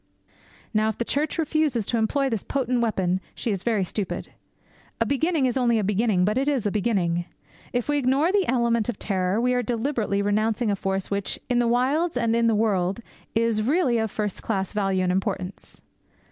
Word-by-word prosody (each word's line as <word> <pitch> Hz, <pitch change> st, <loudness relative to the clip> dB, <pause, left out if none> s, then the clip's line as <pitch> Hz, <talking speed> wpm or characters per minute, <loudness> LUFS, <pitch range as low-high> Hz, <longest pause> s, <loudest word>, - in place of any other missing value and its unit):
Now 215 Hz, 0 st, +2 dB
if 220 Hz, -, -4 dB
the 235 Hz, -, -2 dB
Church 295 Hz, +6 st, -1 dB
refuses 310 Hz, -8 st, +1 dB
to 235 Hz, -, -1 dB
employ 275 Hz, +5 st, +1 dB
this 225 Hz, -6 st, -2 dB
potent 255 Hz, -3 st, 0 dB
weapon, 190 Hz, -5 st, 0 dB
she 230 Hz, -, -2 dB
is 195 Hz, -3 st, -2 dB
very 215 Hz, -2 st, +1 dB
stupid. 190 Hz, +1 st, -4 dB, 0.7 s
A 230 Hz, -, +2 dB
beginning 285 Hz, +4 st, +1 dB
is 250 Hz, 0 st, 0 dB
only 240 Hz, -3 st, +3 dB
a 215 Hz, -, +1 dB
beginning, 205 Hz, -2 st, +2 dB
but 210 Hz, +5 st, +1 dB
it 275 Hz, -, -1 dB
is 275 Hz, -7 st, +1 dB
a 205 Hz, -, +1 dB
beginning. 185 Hz, -5 st, 0 dB, 0.5 s
If 245 Hz, -1 st, -1 dB
we 290 Hz, 0 st, +2 dB
ignore 275 Hz, +6 st, +2 dB
the 395 Hz, -2 st, +2 dB
element 235 Hz, -2 st, +1 dB
of 240 Hz, -, -3 dB
terror, 190 Hz, 0 st, 0 dB
we 250 Hz, +1 st, +2 dB
are 250 Hz, -, +2 dB
deliberately 230 Hz, -4 st, -1 dB
renouncing 215 Hz, +2 st, +1 dB
a -, -, +1 dB
force 195 Hz, 0 st, -3 dB
which, 200 Hz, -1 st, -1 dB
in 245 Hz, -, +3 dB
the 240 Hz, -, +2 dB
wilds 265 Hz, +7 st, +1 dB
and 230 Hz, -2 st, +1 dB
in 235 Hz, 0 st, +3 dB
the 225 Hz, -, +3 dB
world, 200 Hz, -1 st, +1 dB, 0.3 s
is 230 Hz, -1 st, +2 dB
of 215 Hz, -, -1 dB
really 275 Hz, -6 st, +2 dB
first 210 Hz, -1 st, -4 dB
class 195 Hz, -3 st, -2 dB
value 195 Hz, -3 st, +1 dB
and 180 Hz, -, +1 dB
importance. 190 Hz, 0 st, -4 dB
225 Hz, 200 wpm, -25 LUFS, 200-250 Hz, 0.7 s, only